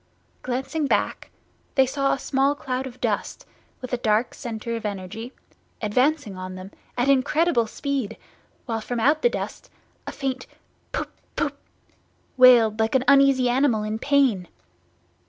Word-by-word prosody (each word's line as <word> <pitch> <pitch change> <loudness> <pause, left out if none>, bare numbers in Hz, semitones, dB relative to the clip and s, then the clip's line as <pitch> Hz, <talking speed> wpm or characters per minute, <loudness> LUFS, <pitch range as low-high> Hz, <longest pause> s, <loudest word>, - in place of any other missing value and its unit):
Glancing 265 +4 -2
back, - - -1 0.5
they 265 - +5
saw 275 +1 0
a - - +1
small 275 +1 +1
cloud 260 -2 -3
of 255 -1 -12
dust, - - -2 0.4
with 255 0 -7
a - - +2
dark 220 0 +1
centre 230 0 -5
of 230 - -5
energy, 210 +3 -5 0.5
advancing 250 +1 +1
on 185 0 -7
them 185 +1 -9 0.3
at 245 +2 +1
incredible 275 -1 +3
speed, 275 -1 -3 0.5
while 225 -2 -2
from 240 +2 -3
out 295 +7 +3
the 485 - +4
dust - - -6 0.4
a - - -3
faint 260 -2 -4 0.4
"Poop - - -3 0.2
poop!" - - -1 0.8
wailed 240 -4 +6
like 220 +3 +1
an 260 - +3
uneasy 275 -2 +5
animal 245 -3 +2
in 215 +1 -3
pain. 265 -11 +2
255 Hz, 145 wpm, -24 LUFS, 220-275 Hz, 0.8 s, wailed